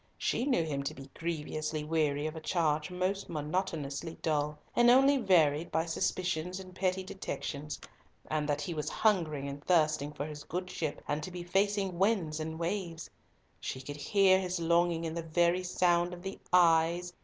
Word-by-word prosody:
She 240 - 0
knew 250 -12 +3
him 145 -3 -2
to - - -3
be 135 0 -11
grievously 155 -2 -3
weary 150 -2 0
of 155 +1 -3
a - - -5
charge 155 -3 0
most 185 +2 -2
monotonously 155 -1 -3
dull, 150 -1 0 0.2
and 240 0 +6
only 270 +3 +6
varied 170 - +3
by 160 0 +1
suspicions 180 +1 -1
and 185 -1 -10
petty 185 0 0
detections; 150 -6 -5 0.5
and 150 -1 -1
that 145 0 0
he 175 - -3
was 150 -2 -2
hungering 160 -10 +1
and 140 +1 -7
thirsting 155 -4 +2
for 145 - -4
his 150 -1 -7
good 180 +3 -4
ship 155 -5 -3
and 150 +1 -1
to 155 - -5
be 180 -1 -6
facing 195 0 0
winds 190 -7 +1
and 160 +1 -4
waves. 170 -2 -3 0.5
She 130 - -4
could 145 +2 -7
hear 190 +4 +4
his 185 -1 -2
longing 170 0 +2
in 160 - -3
the 170 - -3
very 170 +2 +2
sound 180 -1 +2
of 175 - -13
the 195 0 -6
"Ays?" 170 0 +4
170 Hz, 180 wpm, -31 LUFS, 155-185 Hz, 0.5 s, and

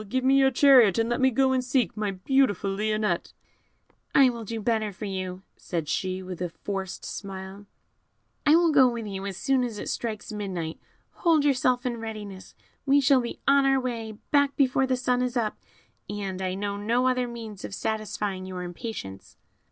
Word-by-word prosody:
Give 260 +3 0
me 270 +1 +5
your 270 0 +5
chariot, 255 -7 +6
and 225 0 +1
let 240 +2 0
me 260 - +5
go 265 +2 +2
and 260 -1 +1
seek 255 0 0
my 210 -1 -1
beautiful 205 0 +1
Lionette." 215 +1 -1 0.8
"I 270 -2 +7
will 235 -1 -7
do 225 +1 -5
better 220 -1 0
for 205 +3 -7
you," 185 -1 -4
said 165 -4 -4
she, 185 +4 -2
with 185 -1 -7
a 180 - -1
forced 190 +2 -5
smile; 195 0 -7 0.8
"I 300 +1 +6
will 335 -1 +4
go 260 -4 +6
with 235 -2 -4
you 195 -1 -5
as 195 -2 -5
soon 270 -2 +1
as 235 -4 -4
it - - -5
strikes 220 -3 -4
midnight; 185 -6 -4 0.3
hold 320 -4 +2
yourself 255 -2 +2
in 240 -2 -1
readiness; 210 -4 -8 0.3
we 280 0 +4
shall 270 -1 +4
be 235 - -6
on 275 0 +5
our 270 0 +3
way 230 -4 -4 0.2
back 285 -1 +3
before 265 -1 +2
the 255 -1 +1
sun 250 0 +1
is 250 0 -1
up, 220 -3 -1 0.5
and 195 -2 -4
I 185 0 -2
know 200 +1 -3
no 235 +5 +1
other 255 -1 +1
means 225 -4 -8
of 195 - -5
satisfying 210 -3 -3
your 185 -1 -5
impatience." 175 - -7
225 Hz, 190 wpm, -26 LUFS, 195-255 Hz, 0.8 s, I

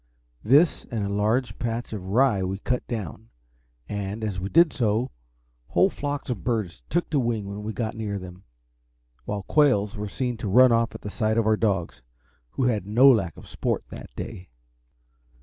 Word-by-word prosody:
This, 145 +9 +4
and 110 -4 -3
a - - -2
large 110 +5 0
patch 120 0 -3
of 100 -4 -5
rye 115 0 +3
we 95 +1 -2
cut 125 +5 -2
down, 110 - -5 0.6
and, 105 +1 -4
as 100 -4 -2
we 95 +2 -3
did 165 +3 +5
so, 115 -1 0 0.6
whole - - +3
flocks 145 -2 -4
of 110 -7 -4
birds 110 -7 -2
took 175 +1 0
to 145 - +2
wing 115 -4 -1
when 100 +1 -6
we 105 +1 -4
got 110 0 -3
near 105 -2 -3
them, 90 0 -10 0.8
while 100 -1 -3
quails 105 -7 +3
were 105 0 -4
seen 125 +2 -2
to 110 - -4
run 125 +5 +6
off 115 0 +1
at - - -8
the 105 - -6
sight 110 +1 0
of 115 - +2
our 110 0 +4
dogs, 95 - -1 0.5
who 135 - -1
had 110 -6 0
no 125 +6 +7
lack 95 -10 0
of - - -12
sport - - -2
that - - -9
day. 100 -6 -7
110 Hz, 185 wpm, -25 LUFS, 100-120 Hz, 0.8 s, no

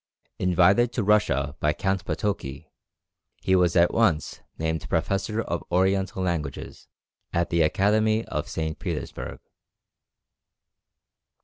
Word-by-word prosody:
Invited 95 +6 +4
to 115 - -1
Russia 75 -9 +2
by 75 0 +2
Count 95 -1 -1
Potoki, 70 -10 -3 0.7
he 95 - +3
was 90 -2 +3
at 85 -1 +4
once 90 -10 +1 0.2
named 80 0 -2
Professor 105 +3 -1
of 85 - -3
Oriental 95 +1 +1
Languages 80 -7 -4 0.4
at 85 0 0
the 85 - +2
Academy 110 +7 +2
of - - -4
St. 80 0 -3
Petersburg. - - -5
90 Hz, 110 wpm, -25 LUFS, 80-100 Hz, 0.7 s, Invited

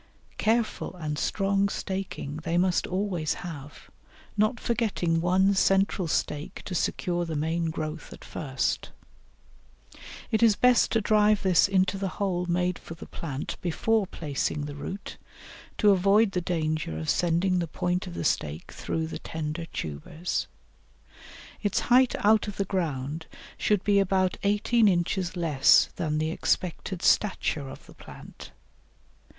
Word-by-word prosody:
Careful 225 -3 0
and 150 -4 -4
strong 200 0 +1
staking 190 -8 -4
they 165 +2 -2
must 180 0 +2
always 185 -4 -1
have, 150 -4 -9 0.4
not 215 +3 +1
forgetting 200 -8 0
one 190 +3 +3
central 195 -1 +2
stake 150 -1 -2
to 185 - -5
secure 175 0 -1
the 165 -2 -4
main 160 +2 0
growth 155 0 -5
at - - -11
first. 135 -4 -2 1.4
It 220 - +2
is 225 -3 +6
best 250 +1 +4
to 225 - +3
drive 210 0 +3
this 185 -1 +4
into 190 0 +1
the 195 - -1
hole 180 -3 -1
made 180 0 0
for 165 - -9
the - - -10
plant 145 -4 -5
before 205 +4 +1
placing 145 -2 -3
the 145 - -6
root, 185 +7 -7 0.6
to 210 -2 +5
avoid 200 +3 +4
the 180 - -1
danger 155 - -2
of 80 0 -5
sending 180 +2 +2
the 170 - -1
point 180 +4 -2
of 175 - -7
the - - -3
stake 75 - -1
through 160 0 -3
the 160 - -6
tender 160 +1 -5
tubers. 115 - -4 1.1
Its 205 -3 +1
height 255 0 +5
out 215 0 +4
of 205 - -6
the 195 - 0
ground 160 -4 -3 0.3
should 210 -3 +1
be 205 -1 +4
about 190 -1 +2
eighteen 210 +3 +3
inches 180 0 0
less 150 -6 +4
than 155 -2 -1
the 155 +1 0
expected 180 +2 -2
stature 155 -8 +1
of 135 - -11
the - - -15
plant. - - -12
180 Hz, 145 wpm, -27 LUFS, 160-200 Hz, 1.4 s, is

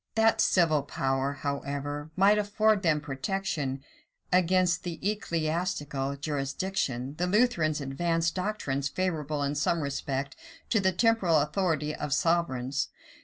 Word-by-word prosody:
That 225 0 +4
the - - +5
civil 160 -5 +3
power, 135 0 -1
however, 145 +1 -4
might 200 +3 +5
afford 210 0 +2
them 155 -5 +2
protection 140 -2 -3 0.5
against 180 0 +3
the 175 -2 -5
ecclesiastical 160 -7 -1
jurisdiction, 140 -2 -2
the 180 - +1
Lutherans 180 -8 +2
advanced 165 +4 0
doctrines 165 -9 -2
favorable 155 -5 -2
in 140 0 0
some 155 +3 +1
respect 140 -1 -3 0.3
to 225 - +3
the 190 -1 +2
temporal 190 -4 +3
authority 150 -1 0
of 145 - -3
sovereigns. 140 -6 0
155 Hz, 120 wpm, -28 LUFS, 140-185 Hz, 0.5 s, the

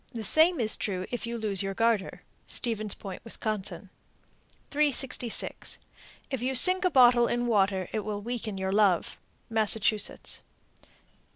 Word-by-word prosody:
The 225 - -4
same 320 - +4
is 220 -2 0
true 185 -3 -3
if 245 -1 -5
you 235 0 -4
lose 210 -4 -2
your 195 0 -4
garter. 225 -3 -1 0.2
Stevens 215 -4 -4
Point, 195 -2 -9
Wis. 230 - -4
366. 235 +5 -3 0.5
If 265 -3 -3
you 260 +2 -2
sink 365 +8 +7
a 365 - +3
bottle 245 -5 +5
in 240 0 -1
water, 195 -5 0
it 220 - -1
will 210 0 -5
weaken 225 -3 -5
your 190 0 -3
love. 200 -4 +1 0.3
_Massachusetts. 215 -1 +1
220 Hz, 135 wpm, -27 LUFS, 200-245 Hz, 0.5 s, sink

